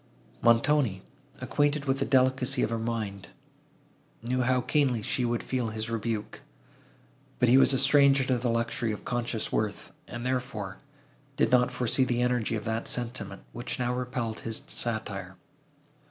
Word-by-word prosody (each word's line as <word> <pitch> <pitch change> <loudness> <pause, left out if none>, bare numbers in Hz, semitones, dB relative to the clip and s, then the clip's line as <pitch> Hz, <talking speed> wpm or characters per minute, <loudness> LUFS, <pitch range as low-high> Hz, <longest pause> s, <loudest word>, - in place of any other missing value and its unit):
Montoni, 115 -3 +3 0.4
acquainted 145 0 +1
with 135 0 0
the - - +1
delicacy 130 0 +2
of 110 - -1
her 115 - -1
mind, 110 -4 -3 1.0
knew 125 +2 0
how 125 +1 +2
keenly 130 -6 +1
she 125 - -1
would 120 0 -1
feel 125 -3 -1
his 110 +1 -4
rebuke; 115 -1 -3 1.0
but 125 - +3
he 125 - +6
was - - +5
a 135 - +3
stranger 140 0 +5
to 130 -2 +1
the 120 0 -1
luxury 115 0 0
of 105 - -6
conscious 120 -2 -2
worth, 105 -1 -2 0.2
and, 120 +1 -6
therefore, 125 -7 -3 0.6
did 145 - +2
not 125 -1 +4
foresee 125 +2 +1
the 120 -1 +1
energy 125 -2 0
of 110 - -4
that 115 0 -2
sentiment, 120 -5 -3
which 120 - -4
now 125 -1 0
repelled 125 -3 -3
his 115 -1 -4
satire. 115 -2 -4
120 Hz, 155 wpm, -28 LUFS, 115-130 Hz, 1.0 s, he